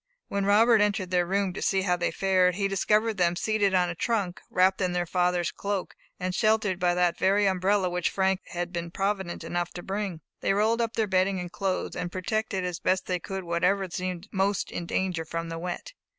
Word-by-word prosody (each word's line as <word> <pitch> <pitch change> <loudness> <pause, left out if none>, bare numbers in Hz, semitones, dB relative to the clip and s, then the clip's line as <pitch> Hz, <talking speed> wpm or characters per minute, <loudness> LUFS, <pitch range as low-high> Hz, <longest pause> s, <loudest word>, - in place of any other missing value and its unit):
When 200 0 -1
Robert 220 +2 +5
entered 205 -3 0
their 175 -1 +2
room 195 0 0
to - - -6
see 190 -1 +1
how 180 -2 +2
they 175 -1 0
fared, 185 -2 +2
he 200 +1 +1
discovered 210 +3 +1
them 175 -1 +2
seated 205 0 +1
on 180 -1 +3
a 175 - -3
trunk, 195 -1 -1
wrapped 185 +1 +3
in 180 -1 +1
their 175 0 0
father's 180 -1 +1
cloak, 200 -2 -3 0.2
and 185 0 -2
sheltered 215 -3 +2
by 175 -1 +2
that 175 -1 +1
very 200 +2 +3
umbrella 190 +1 +2
which 180 -1 0
Frank 190 0 +1
had 175 +1 -4
been 170 -1 -3
provident 195 -1 -2
enough 175 0 -2
to 175 - -7
bring. 195 -4 -3 0.2
They - - +1
rolled 220 +3 +2
up 230 -1 -1
their 220 - +2
bedding 190 -1 +1
and 175 -1 -6
clothes, 195 -2 -2
and 180 -1 -3
protected 195 +1 -2
as 180 -2 -3
best 185 +1 +1
they 180 -1 -1
could 190 +2 -5
whatever 180 +3 +1
seemed 185 +1 -4
most 195 0 0
in 170 - -5
danger 180 -3 -1
from 165 +1 -4
the 165 0 -5
wet. 180 - -5
185 Hz, 210 wpm, -27 LUFS, 180-200 Hz, 0.2 s, Robert